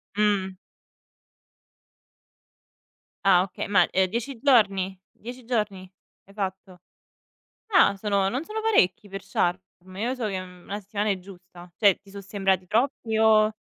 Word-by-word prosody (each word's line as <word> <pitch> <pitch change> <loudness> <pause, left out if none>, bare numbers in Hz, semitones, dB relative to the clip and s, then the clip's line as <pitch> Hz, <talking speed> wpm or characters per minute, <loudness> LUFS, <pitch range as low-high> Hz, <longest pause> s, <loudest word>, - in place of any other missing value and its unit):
Mh. 200 -3 +1 2.7
Ah 185 -2 +6
okay, 190 - -6
ma, 205 0 +4
ehm, 190 0 +2
10 235 +4 -4
giorni? 195 -8 +2
10 245 +1 -10
giorni 205 -6 -2 0.3
hai 195 - -18
fatto? 190 -2 -5 1.0
Ah 200 - +5
sono 200 -1 0
non 260 +8 -3
sono 430 +4 -5
parecchi 210 - +2
per 195 0 -6
Sharm? 180 -2 0 0.4
Io 235 +6 -1
so 235 -5 -3
che, 190 -2 -3
mhmm, 180 -1 -12
1 205 +1 -5
settimana 205 +1 -3
è 195 - 0
giusta, 180 -1 -14
cioè 200 -4 +4
ti 200 0 -19
so 200 0 -8
sembrati 195 -2 -1
troppi 230 -1 0
o 215 -1 +5
200 Hz, 140 wpm, -25 LUFS, 190-220 Hz, 2.7 s, Ah